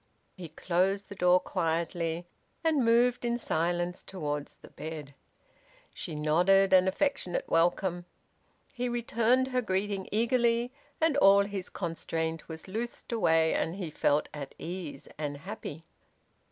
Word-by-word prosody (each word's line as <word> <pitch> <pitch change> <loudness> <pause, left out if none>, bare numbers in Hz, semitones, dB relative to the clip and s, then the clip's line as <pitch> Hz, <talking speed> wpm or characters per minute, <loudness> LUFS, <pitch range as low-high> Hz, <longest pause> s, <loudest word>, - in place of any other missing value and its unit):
He 175 -4 -8
closed 190 +5 0
the 200 - -7
door 180 -1 +5
quietly, 170 -1 -1 0.4
and 315 -5 +3
moved 240 +2 +3
in 240 0 0
silence 175 -3 -1
towards 150 -6 -4
the - - -16
bed. 150 -3 -7 0.8
She 165 - -6
nodded 180 +6 +4
an 185 0 +6
affectionate 190 -3 0
welcome. 175 +1 +1 0.7
He 250 -2 -2
returned 240 +2 +2
her 255 -1 +1
greeting 195 -2 -2
eagerly, 235 +2 +2 0.3
and 320 -3 +3
all 200 -5 +6
his 200 -2 -5
constraint 165 -2 -3
was 160 +2 -8
loosed 225 +6 -5
away, 165 -8 +3
and 165 - -1
he 180 -5 -5
felt 145 0 +1
at 140 -2 -7
ease, 170 -5 -6
and 145 -2 -3
happy. 145 +2 -7
185 Hz, 130 wpm, -30 LUFS, 165-230 Hz, 0.8 s, an